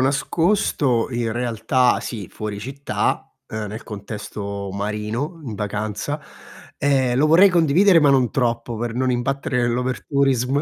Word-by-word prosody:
nascosto 140 - +1
in 120 -2 -1
realtà 125 +1 +1
sì, 105 -7 -6
fuori 105 -1 -5
città, 135 +4 -2
ehm, 110 -1 -4
nel 110 +3 -7
contesto 100 -1 -6
marino, 105 - -3
in 115 -4 -5
vacanza; 105 +7 -3 0.6
e 135 -3 +2
lo 150 +4 +4
vorrei 175 +6 +7
condividere 175 +2 +5
ma 145 -3 +5
non 130 -4 +3
troppo 115 -2 -1
per 120 0 -3
non 130 +1 +1
imbattere 125 +1 -1
nell' 120 0 +1
overtourism. 130 +1 0
125 Hz, 135 wpm, -22 LUFS, 110-140 Hz, 0.6 s, vorrei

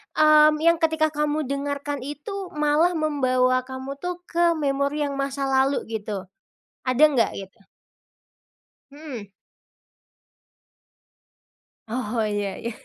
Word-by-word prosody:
mmm, 305 0 +6
yang 335 0 +5
ketika 320 -1 +2
kamu 300 +1 -1
dengarkan 285 +1 -3
itu 290 +8 -7 0.2
malah 300 +4 +3
membawa 255 -5 +2
kamu 265 +1 -6
tuh, 355 0 -4
ke 340 -1 +2
memori 280 0 0
yang 280 -1 -2
masa 275 0 -2
lalu 265 +1 +2
gitu, 205 -4 -4 0.6
ada 255 +4 +3
enggak? 265 -6 +1
Gitu. 195 +3 -9 1.3
Mhm. 280 -9 -8 2.6
Oh, 230 -1 -2
iya 205 -2 -2
iya. 235 - -4
280 Hz, 105 wpm, -24 LUFS, 255-305 Hz, 2.6 s, mmm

